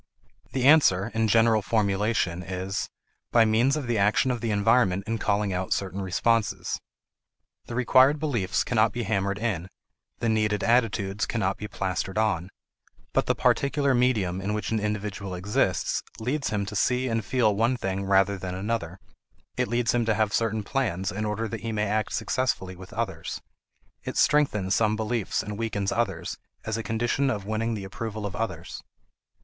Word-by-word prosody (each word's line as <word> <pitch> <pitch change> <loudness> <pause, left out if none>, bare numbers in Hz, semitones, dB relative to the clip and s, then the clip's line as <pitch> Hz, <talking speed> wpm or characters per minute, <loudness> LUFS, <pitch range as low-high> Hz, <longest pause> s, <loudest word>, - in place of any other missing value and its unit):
The 130 -1 -1
answer, 120 -9 +5
in 110 0 +1
general 115 0 +4
formulation, 100 -3 0
is: 95 +2 -3 0.4
By 115 -2 +5
means 115 +6 +3
of 145 - -3
the 120 -3 0
action 105 +6 +3
of 120 - -3
the 115 - -1
environment 100 -2 +3
in 115 0 -2
calling 100 -1 0
out 90 0 0
certain 95 0 -3
responses. 105 +4 0 0.9
The 120 - -5
required 130 +3 +5
beliefs 120 -12 0
cannot 110 -2 +2
be 120 - -2
hammered 100 -2 0
in; 100 -5 -2 0.5
the 115 - -2
needed 105 -2 +1
attitudes 110 -4 +1
cannot 100 -4 -1
be 105 - -6
plastered 95 0 -3
on. 95 -5 +1 0.6
But - - +1
the - - +2
particular 140 0 +2
medium 110 -8 +1
in 105 +2 -2
which 105 - -3
an 110 - +1
individual 105 -2 -3
exists 95 +4 0 0.2
leads 135 +6 -1
him 100 -2 -1
to 105 +1 -6
see 125 +5 +1
and 115 -2 -1
feel 110 -1 +2
one 115 +4 +2
thing 95 -3 -2
rather 95 0 +3
than 90 0 -4
another; 95 -3 -3 0.6
it - - 0
leads 120 0 +1
him 120 -1 +2
to 110 -1 +2
have 110 -1 +1
certain 110 -2 0
plans 100 -7 -1
in 105 +4 -3
order 105 +2 -2
that 110 -1 -6
he 115 - -3
may 105 -1 0
act 110 +1 -1
successfully 120 -8 -1
with 95 +1 -12
others; - - -4 0.6
it - - -5
strengthens 105 -11 +3
some 110 +1 +2
beliefs 110 -1 -1
and 105 +1 -6
weakens 100 -3 -1
others 100 -8 -2 0.3
as 110 - -2
a 115 - -2
condition 120 +5 0
of 105 -6 -2
winning 110 +2 -1
the 100 - -5
approval 110 +2 -5
of 100 -1 -4
others. 115 +2 -4
110 Hz, 175 wpm, -26 LUFS, 100-115 Hz, 0.9 s, answer